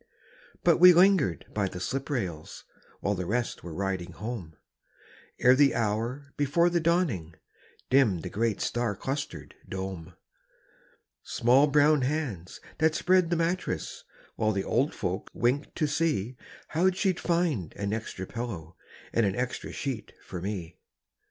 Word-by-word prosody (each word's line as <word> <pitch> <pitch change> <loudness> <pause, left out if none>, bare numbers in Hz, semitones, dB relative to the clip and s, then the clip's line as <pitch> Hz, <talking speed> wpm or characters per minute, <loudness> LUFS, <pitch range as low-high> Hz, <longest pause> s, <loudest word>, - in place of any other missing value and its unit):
But 170 -2 +5
we 180 +1 +9
lingered 175 - +4
by 100 -2 0
the 90 - -7
slip 135 +9 -3
rails 90 - -4 0.4
While 100 - +1
the 90 -3 -4
rest 120 +3 -2
were 85 - -7
riding 95 0 -3
home, 100 -5 -6 0.8
Ere 125 - +6
the 140 +1 +4
hour 115 +6 -2
before 160 +5 +3
the 170 - +2
dawning, 155 - 0 0.6
Dimmed 115 -11 +4
the - - -4
great 110 0 0
star 120 -4 -1
clustered 135 +7 -5 0.2
dome. 95 -4 -6 1.1
Small 130 +5 +3
brown 150 0 +4
hands 125 - -3 0.2
that 160 0 +3
spread 185 -2 +3
the 175 - +1
mattress 165 - -2 0.3
While 110 0 +1
the 100 -1 -1
old 130 +9 0
folk 95 +2 -3
winked 125 +5 0
to 155 - +1
see 145 -6 0 0.3
How 175 +4 +3
she'd 190 -1 0
find 165 - 0
an 100 +1 -2
extra 110 -4 -4
pillow 95 -8 -6 0.4
And 115 - +3
an 100 -2 +1
extra 125 0 -3
sheet 130 -6 -4
for 90 -3 -7
me. 95 -4 -5
120 Hz, 145 wpm, -28 LUFS, 95-150 Hz, 1.1 s, we